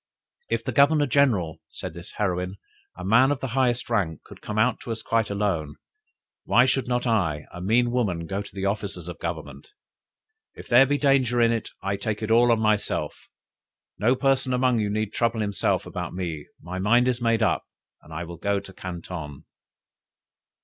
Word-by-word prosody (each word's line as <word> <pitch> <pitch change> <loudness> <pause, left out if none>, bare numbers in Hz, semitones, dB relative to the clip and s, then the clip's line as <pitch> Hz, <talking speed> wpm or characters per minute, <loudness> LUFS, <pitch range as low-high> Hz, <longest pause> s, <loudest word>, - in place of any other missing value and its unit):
"If - - -1
the - - -2
Governor 145 +1 +4
general," 120 - +2
said 90 - -7
this 85 +2 -10
heroine, 90 -2 -1 0.4
"a 90 - -6
man 120 +7 +5
of 145 -2 0
the 130 - -4
highest 125 -1 +1
rank, 95 -9 -1
could - - -14
come 105 - -5 0.2
to 120 - -7
us 110 0 -5
quite 115 -1 +1
alone, 95 -8 -1 0.7
why 120 +2 +4
should 130 0 0
not 125 0 0
I, 85 -11 0
a 90 - -7
mean 120 +5 +2
woman, 100 -9 -1
go 95 +4 -3
to 100 - -11
the 95 0 -3
officers 100 -4 -3
of 85 -3 -7
Government? 85 - -6 0.9
If - - -11
there 125 +2 +6
be 145 +1 +1
danger 135 -4 +2
in 115 0 +4
it, 115 -2 -2
I 100 +1 -1
take 105 +1 -3
it 110 - -2
all 120 +1 +5
on 115 - +3
myself; 110 -1 0 0.8
no 120 +6 +3
person 135 -1 +1
among 125 -2 +2
you 105 -1 0
need 105 0 -2
trouble 115 -1 0
himself 100 -1 0
about - - -5
me 80 -5 -4
my 90 +2 -6
mind 120 +6 +4
is 125 -1 0
made 115 -1 +2
up, - - +2 0.4
and 80 - -17
I 80 +2 -4
will 85 0 -8
go 100 +3 0
to 95 -1 -13
Canton!" 85 -5 -7
105 Hz, 185 wpm, -25 LUFS, 90-120 Hz, 0.9 s, there